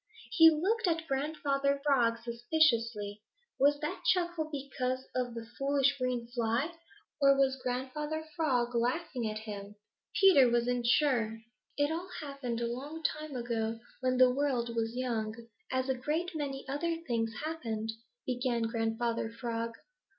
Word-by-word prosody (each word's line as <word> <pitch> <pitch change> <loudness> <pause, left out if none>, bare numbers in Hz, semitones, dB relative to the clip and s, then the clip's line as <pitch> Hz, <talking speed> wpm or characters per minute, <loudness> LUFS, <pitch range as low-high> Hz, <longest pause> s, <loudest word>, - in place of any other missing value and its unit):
He 325 -1 +9
looked 375 +8 +1
at 325 -1 0
Grandfather 280 -1 0
Frog 240 -5 +3
suspiciously. 230 -4 +1 0.4
Was 285 +1 +4
that 335 +5 -3
chuckle 345 -3 +1
because 260 -2 -3
of 245 -2 -2
the 230 -1 -5
foolish 275 0 +3
green 250 -2 -1
fly, 240 +6 -1 0.5
or 275 0 +6
was 265 -1 +2
Grandfather 295 +5 -3
Frog 250 -7 +1
laughing 245 0 0
at 215 - -4
him? 210 -2 -7 0.4
Peter 325 -11 +7
wasn't 240 0 +1
sure. 235 -5 +2 0.3
"It 290 +1 +2
all 345 +3 -3
happened 275 -6 -4
a - - +1
long 295 +6 -7
time 305 -2 -2
ago 230 -2 -2 0.2
when 255 0 +1
the 255 0 +7
world 250 -4 0
was 225 0 -1
young, 225 -4 -1 0.4
as 260 0 0
a 265 - +2
great 305 +8 -2
many 275 -3 -4
other 315 +5 -1
things 230 -3 -1
happened," 225 -9 -3 0.3
began 245 -2 0
Grandfather 225 0 -1
Frog. 230 0 -4
255 Hz, 140 wpm, -32 LUFS, 235-290 Hz, 0.5 s, He